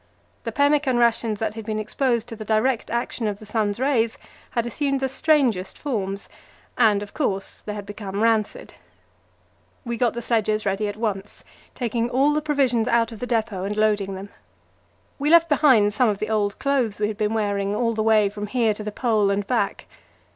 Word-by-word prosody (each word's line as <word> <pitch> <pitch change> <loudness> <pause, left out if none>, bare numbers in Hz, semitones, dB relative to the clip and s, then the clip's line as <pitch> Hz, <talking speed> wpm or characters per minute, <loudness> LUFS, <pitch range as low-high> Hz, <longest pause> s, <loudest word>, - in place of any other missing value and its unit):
The - - -2
pemmican 285 -3 +2
rations 230 -2 +2
that 215 0 -2
had 225 0 -7
been 215 0 -3
exposed 235 +2 -1
to 230 - -6
the 215 - -7
direct 220 +3 +1
action 235 -1 -2
of 205 -1 -2
the 215 - -13
sun's 210 -1 -1
rays 245 -4 +1 0.4
had 235 - +2
assumed 275 +3 -1
the 265 - 0
strangest 260 -8 +1
forms, 200 -8 -3 0.5
and, 210 -4 +3
of 205 - -11
course, 195 -10 -2
they 210 - -5
had 205 -1 -6
become 205 0 -4
rancid. 225 -2 0 1.1
We 235 -1 -3
got 240 -2 +1
the 235 - -4
sledges 215 -2 0
ready 200 +2 0
at 205 0 -5
once, 210 -3 -4 0.3
taking 235 -1 -1
all 275 +4 +3
the 305 - 0
provisions 270 -6 +1
out 235 -1 +2
of 225 - -9
the 245 - -4
depot 220 -5 -1
and 205 +2 -3
loading 205 -2 +1
them. 195 +2 -8 0.9
We 290 +2 0
left 335 0 +6
behind 260 -9 +4
some 240 +2 +3
of 205 - -1
the 215 +2 -3
old 205 -2 0
clothes 255 -7 0
we 210 - +1
had 210 -1 -5
been 215 +1 0
wearing 200 -2 0
all 230 +1 +1
the 220 - -1
way 215 -1 +4
from 205 +1 -5
here 225 -1 +1
to 210 - -7
the 210 - -4
Pole 215 -3 +1
and 200 0 0
back. 215 -3 -1
220 Hz, 195 wpm, -23 LUFS, 205-245 Hz, 1.1 s, left